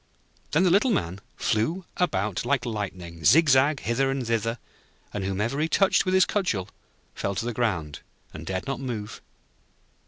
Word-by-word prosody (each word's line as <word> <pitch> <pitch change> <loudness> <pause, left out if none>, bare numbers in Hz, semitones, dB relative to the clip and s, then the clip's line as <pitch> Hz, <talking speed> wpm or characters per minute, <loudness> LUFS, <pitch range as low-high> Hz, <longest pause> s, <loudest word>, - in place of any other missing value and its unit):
Then 160 +5 +3
the 180 - +4
Little 205 +8 +4
Man 90 - -1
flew 160 - 0
about 105 - 0
like 130 +1 0
lightning, 90 -7 -5
zig 155 - +6
zag, 135 +2 +4
hither 135 +3 +1
and 135 -2 -2
thither, 115 0 0 0.6
and 100 - -3
whomever 105 +8 -1
he 155 - +2
touched 195 +2 +3
with 185 0 +1
his 190 - +6
cudgel 115 - -1 0.4
fell 100 0 -3
to 115 - -2
the 120 - -2
ground, 85 - -1 0.3
and 80 - -8
dared 95 +2 -3
not 135 -1 -3
move. 115 -6 -5
115 Hz, 165 wpm, -26 LUFS, 100-145 Hz, 0.6 s, zig